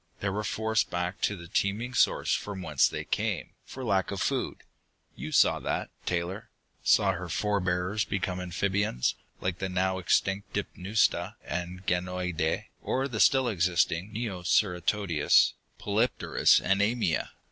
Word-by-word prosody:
They 100 - -1
were 105 +2 -2
forced 110 +1 0
back 90 +4 -3
to 105 - +1
the 85 -1 -10
teeming 105 +8 -1
source - - +2
from 100 -3 -3
whence 75 -5 +3
they - - -4
came, - - -2 0.2
for 130 - -7
lack 95 -4 +1
of 100 - -4
food. - - -2 0.5
You 75 +4 -6
saw - - +4
that, - - -3 0.2
Taylor 90 +4 -2 0.3
saw 100 -2 +4
her 90 -1 -5
forebears 100 +1 0
become 95 -2 -2
amphibians, 95 -5 0 0.3
like 90 -1 -2
the 95 - -2
now 95 +1 0
extinct 95 +2 0
Dipneusta 100 +4 0
and 90 +1 -5
Ganoideii, 90 -3 -1
or 135 +1 -1
the 120 -5 -5
still 130 +5 +5
existing 90 -1 +1
Neoceratodus, 90 -4 +2 0.3
Polypterus 110 +4 +3
and 95 +2 +1
Amia. 105 -6 +1
95 Hz, 135 wpm, -28 LUFS, 90-105 Hz, 0.5 s, still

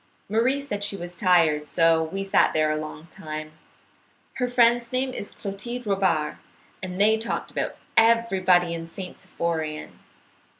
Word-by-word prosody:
Marie 235 +7 +2
said 210 -8 -4
she 205 -1 -1
was 175 -1 -7
tired, 165 -6 +3
so 165 -1 +4
we 195 +5 -4
sat 195 - +3
there 155 -1 +2
a - - 0
long 155 +1 -6
time. 155 0 -6 0.9
Her 250 -1 0
friend's 240 -1 +3
name 255 0 -1
is 205 - -5
Clotilde 235 +5 -6
Robard. 190 -7 +1 0.4
They 200 +4 +2
talked 225 - -3
about - - -3 0.2
everybody 190 -7 +4
in 165 0 -5
St. 180 +2 -8
Symphorien. 160 -2 -4
190 Hz, 140 wpm, -25 LUFS, 165-225 Hz, 0.9 s, so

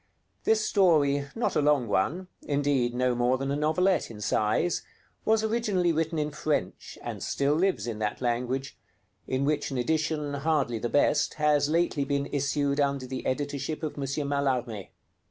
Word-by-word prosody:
This 220 -1 +3
story, 145 -7 +3
not 230 - -1
a - - +3
long 145 -4 +3
one, 155 - 0
indeed, 140 -4 0
no 125 0 +2
more 120 +1 +2
than 135 +1 -2
a - - 0
novelette 165 +6 +1
in 110 -2 -9
size, 110 +10 +1 0.4
was 220 0 +3
originally 215 -6 +1
written 160 0 -1
in 150 0 -1
French, 150 -10 -3
and - - -5
still 140 +1 +1
lives 170 - +1
in 115 -3 -4
that 105 -1 -2
language; 125 +2 -2 0.5
in 130 +1 0
which 150 +1 0
an 135 - -3
edition, 155 +2 -1
hardly 140 -5 0
the 120 - -2
best, 145 +2 +2
has 150 -1 +2
lately 165 -3 +1
been 140 0 -1
issued 140 0 0
under 140 -2 +1
the 130 0 -5
editorship 145 +3 -3
of 155 - -2
M. - - -8 0.3
Mallarmé. 130 -7 -1
145 Hz, 165 wpm, -28 LUFS, 130-155 Hz, 0.5 s, This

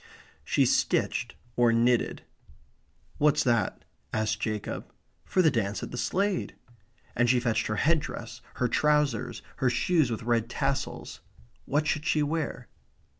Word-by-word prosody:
She - - +2
stitched - - +1 0.2
or 120 -1 +4
knitted. 120 +1 +2 1.0
"What's 150 0 +4
that?" 120 -3 0 0.3
asked 110 0 0
Jacob. 110 -2 -4 0.3
"For 185 - +2
the 160 - +5
dance 105 -4 -1
at - - -6
the - - -5
Slade." 195 0 0 0.6
And 120 0 +3
she 125 0 +4
fetched 115 -3 0
her 110 - -1
head 160 +7 +3
dress; 120 -4 -7
her 125 -1 +1
trousers; 145 -4 +1
her 130 -2 +2
shoes 135 +4 +2
with 115 -1 -4
red 115 -1 +1
tassels. 135 +1 -3 0.4
What 150 +2 +1
should 155 -1 -1
she 150 - +2
wear? 150 -5 -3
125 Hz, 140 wpm, -28 LUFS, 115-150 Hz, 1.0 s, the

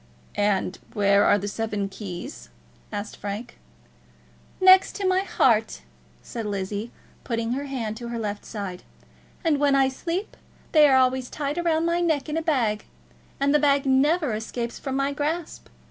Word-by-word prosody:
"And 200 -2 0
where 200 -1 +4
are 205 - +5
the 205 0 -4
seven 210 -1 -2
keys?" 200 - -8 0.4
asked 205 0 -5
Frank. 205 +4 -6 1.0
"Next 375 0 +6
to 395 -2 -1
my 370 0 +3
heart," 225 - +1 0.4
said 225 -2 -5
Lizzie, 200 +3 -3 0.3
putting 230 -1 -2
her 275 +3 -2
hand 235 -5 -4
on 235 - -5
her 235 - -4
left 210 -2 -4
side. 195 -4 -6 0.6
"And 315 -4 +2
when 285 -1 +3
I 270 -1 +4
sleep 340 +9 -4 0.4
they 305 -2 +7
are 265 - +5
always 255 -1 +2
tied 295 +3 -3
round 325 -1 +2
my 340 +1 +1
neck 315 -5 +1
in 300 - -2
a 325 - 0
bag, 245 -10 0 0.5
and 280 +1 +2
the 300 - +5
bag 280 -1 +3
never 285 +1 +3
escapes 235 +2 -4
from 265 -1 -4
my 275 +1 0
grasp. 305 +3 -3
260 Hz, 160 wpm, -25 LUFS, 210-300 Hz, 1.0 s, they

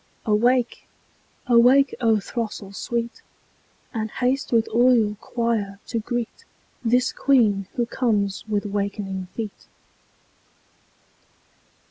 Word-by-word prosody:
Awake! 240 +3 +1 0.6
awake, 255 +2 +5
O 225 -2 +3
throstle 210 -2 -5
sweet! 235 +2 -3 0.7
And 220 -2 -2
haste 255 +4 -1
with 230 -2 +3
all 245 +3 +5
your 215 -3 +2
choir 225 -3 -2
to 230 - -2
greet 240 +1 -4 0.4
This 250 +2 +2
Queen 215 -8 +2
who 240 - +1
comes 210 -5 -1
with 210 -1 -1
wakening 200 -2 -3
feet. 220 -3 -6
230 Hz, 100 wpm, -23 LUFS, 205-245 Hz, 0.7 s, awake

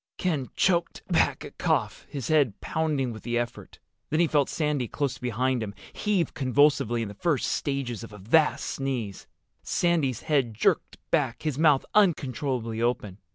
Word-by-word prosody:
Ken 155 -8 -1
choked 175 -2 +1
back - - +2
a - - -8
cough, - - -1
his 135 -5 -5
head 140 -10 +3
pounding 150 -5 -1
with 110 - -9
the 120 0 -1
effort. 120 0 -4 0.3
Then 155 - +1
he 175 - +5
felt 145 -3 +2
Sandy, 150 -5 0
close 135 0 -2
beside 125 +1 0
him, 105 -2 -5 0.2
heave 200 -7 0
convulsively 135 -3 +2
in - - -4
the 100 - -8
first 145 - 0
stages 135 -5 -2
of 115 - -9
a 105 - -10
vast 135 +11 +2
sneeze. 125 -8 -3 0.3
Sandy's 160 -8 +1
head 135 -7 +1
jerked - - +1
back, - - 0
his 150 -3 -2
mouth 150 -4 +4
uncontrollably 130 - +1
open. 110 -5 -1
135 Hz, 160 wpm, -27 LUFS, 120-150 Hz, 0.3 s, he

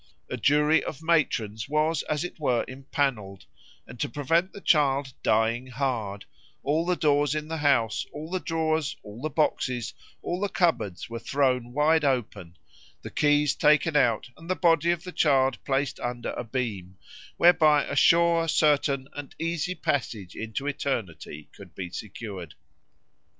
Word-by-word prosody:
"A - - -1
jury 150 +5 +3
of 155 +2 -7
matrons 120 -9 0
was, 155 +2 +1
as 150 +1 0
it 175 - -7
were, 130 -6 +1
empanelled, 130 - -3 0.4
and 120 - -12
to - - -1
prevent 165 +8 0
the - - -10
child 140 -6 +2
'dying 115 +3 +1
hard' 120 -6 -3 0.4
all 155 +5 0
the 180 - +2
doors 145 -2 +2
in 155 0 -4
the 160 - -3
house, 135 -8 +1
all 150 +2 -7
the 185 - -1
drawers, 160 -3 -1
all 105 +3 -10
the 155 - -2
boxes, 130 -5 -1 0.3
all 175 - -2
the 205 - 0
cupboards 160 - 0
were 115 0 -6
thrown 125 -2 0
wide 150 +4 +3
open, 105 -10 -2 0.5
the - - -7
keys 145 -1 +3
taken 150 +1 +3
out, 135 -3 +2
and 165 +2 -13
the 185 - +1
body 165 -2 +3
of 175 -1 0
the 180 - -7
child 135 -6 +2
placed 135 0 -1
under 120 0 -4
a - - -5
beam, 105 -7 -4 0.4
whereby 155 -4 +5
a - - -4
sure, 170 +2 +4
certain, 145 -3 +2
and 145 -1 -8
easy 165 +2 -2
passage 120 - -3
into 110 +5 -5
eternity 95 - -4
could - - -14
be 90 -2 -6
secured." 95 -5 -8
140 Hz, 155 wpm, -26 LUFS, 120-155 Hz, 0.5 s, whereby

